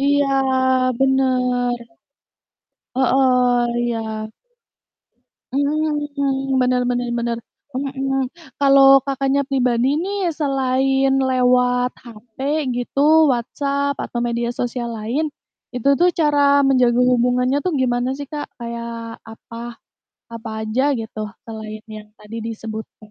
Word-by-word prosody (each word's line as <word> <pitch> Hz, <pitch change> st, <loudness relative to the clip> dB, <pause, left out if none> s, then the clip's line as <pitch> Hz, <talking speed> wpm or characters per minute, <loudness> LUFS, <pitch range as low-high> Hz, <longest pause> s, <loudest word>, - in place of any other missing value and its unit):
Iya, 285 Hz, 0 st, +2 dB, 0.7 s
bener. 255 Hz, -2 st, +2 dB, 1.2 s
Heeh, 250 Hz, -1 st, +3 dB, 0.2 s
iya. 220 Hz, -2 st, -3 dB, 1.2 s
Mhm, 285 Hz, -1 st, -1 dB
bener 250 Hz, 0 st, +2 dB
bener 245 Hz, 0 st, -1 dB
bener. 235 Hz, 0 st, -2 dB, 0.4 s
Mhm, 270 Hz, -1 st, -2 dB, 0.3 s
kalau 275 Hz, -1 st, +7 dB
Kakaknya 275 Hz, +1 st, 0 dB
pribadi 255 Hz, +1 st, +1 dB
nih 380 Hz, +2 st, -1 dB
selain 270 Hz, -2 st, +1 dB
lewat 250 Hz, -1 st, +2 dB, 0.2 s
HP 225 Hz, -1 st, -15 dB, 0.3 s
gitu, 285 Hz, +6 st, +3 dB
WhatsApp 280 Hz, +4 st, -2 dB
atau 240 Hz, -, -4 dB
media 235 Hz, 0 st, -1 dB
sosial 240 Hz, -1 st, -3 dB
lain, 250 Hz, +8 st, -2 dB, 0.4 s
itu 250 Hz, +2 st, 0 dB
tuh 355 Hz, +1 st, +5 dB
cara 285 Hz, -3 st, +3 dB
menjaga 250 Hz, -3 st, +3 dB
hubungannya 250 Hz, +1 st, +2 dB
tuh 365 Hz, -, 0 dB
gimana 255 Hz, -2 st, 0 dB
sih, 285 Hz, 0 st, -7 dB
Kak? 295 Hz, -1 st, -4 dB, 0.2 s
Kayak 235 Hz, -1 st, -6 dB
apa 230 Hz, +1 st, -9 dB, 0.6 s
apa 230 Hz, -1 st, -7 dB
aja 260 Hz, +7 st, +1 dB
gitu 225 Hz, -2 st, -6 dB, 0.2 s
selain 215 Hz, -1 st, -8 dB
yang 215 Hz, -1 st, -9 dB
tadi 215 Hz, +1 st, -9 dB
disebutkan. 220 Hz, -1 st, -8 dB
255 Hz, 105 wpm, -20 LUFS, 235-275 Hz, 1.2 s, kalau